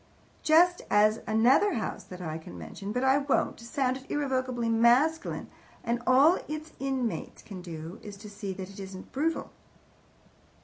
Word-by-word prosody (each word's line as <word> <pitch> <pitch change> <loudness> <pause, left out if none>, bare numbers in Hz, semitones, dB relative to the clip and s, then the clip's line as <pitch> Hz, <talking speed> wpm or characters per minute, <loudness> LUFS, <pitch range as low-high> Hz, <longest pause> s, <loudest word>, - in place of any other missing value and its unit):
Just 350 +3 +5
as 210 +2 +4
another 245 - +4
house 220 - -3
that 180 0 -10
I 160 -2 -4
can 90 - -11
mention, 195 - -7
but 250 +3 -1
I 265 +1 +4
won't, 280 -1 0
sounded 260 +2 -2
irrevocably 255 -4 -1
masculine, 240 +8 +3 0.4
and 235 +1 -1
all 275 +7 +6
its 310 +1 -6
inmates 265 -4 -3
can 195 -4 -8
do 165 +1 -8
is 205 -1 -9
to 210 +2 -11
see 200 -1 -5
that 190 0 -7
it 200 - -12
isn't 190 -1 -9
brutal." 320 +4 -1
235 Hz, 150 wpm, -29 LUFS, 200-275 Hz, 0.4 s, all